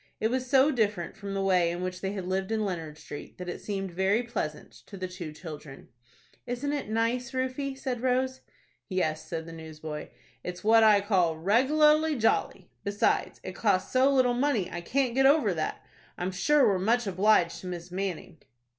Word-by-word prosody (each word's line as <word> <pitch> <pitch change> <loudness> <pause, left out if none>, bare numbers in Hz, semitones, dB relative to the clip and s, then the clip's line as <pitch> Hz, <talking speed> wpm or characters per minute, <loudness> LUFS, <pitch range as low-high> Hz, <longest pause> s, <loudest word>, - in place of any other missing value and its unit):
It 220 +1 +1
was 255 0 -1
so 275 +2 +5
different 210 - -1
from 200 -2 -6
the 195 - 0
way 180 -3 +3
in 175 +1 -4
which 185 0 -4
they 195 0 -2
had 190 -3 -4
lived 190 +2 -2
in 220 -1 0
Leonard 165 -5 -4
Street, 145 - -9
that 180 - -7
it 175 - -5
seemed 195 -2 -4
very 190 +6 +1
pleasant 200 -11 -4 0.2
to 200 - -9
the 185 0 -3
two 180 -3 -7
children. 150 -3 -10 0.6
"Isn't 255 +4 -2
it 285 -7 -3
nice, 230 +3 0
Rufie?" 260 +1 -2
said 255 -3 -3
Rose. 260 +1 0 0.5
"Yes," 160 -5 -1
said 165 -1 -4
the 165 - -9
newsboy. 155 -1 -7 0.3
"It's 180 0 -6
what 225 +1 +6
I 210 -2 +6
call 185 -6 +2
reg'larly 300 - +3
jolly. 225 - 0
Besides, 205 +3 0
it 185 - -5
cost 190 -3 +1
so 260 +2 +4
little 255 -3 +3
money, 240 -7 0
I 175 - -4
can't 255 +6 0
get 270 +1 +5
over 275 -9 +4
that. 155 -2 -4 0.3
I'm 180 +1 -2
sure 270 +11 +3
we're 195 -2 +2
much 230 +5 +2
obliged 190 -2 +2
to 185 - -8
Miss 175 -1 -6
Manning." 185 -3 -4
200 Hz, 190 wpm, -28 LUFS, 180-250 Hz, 0.6 s, what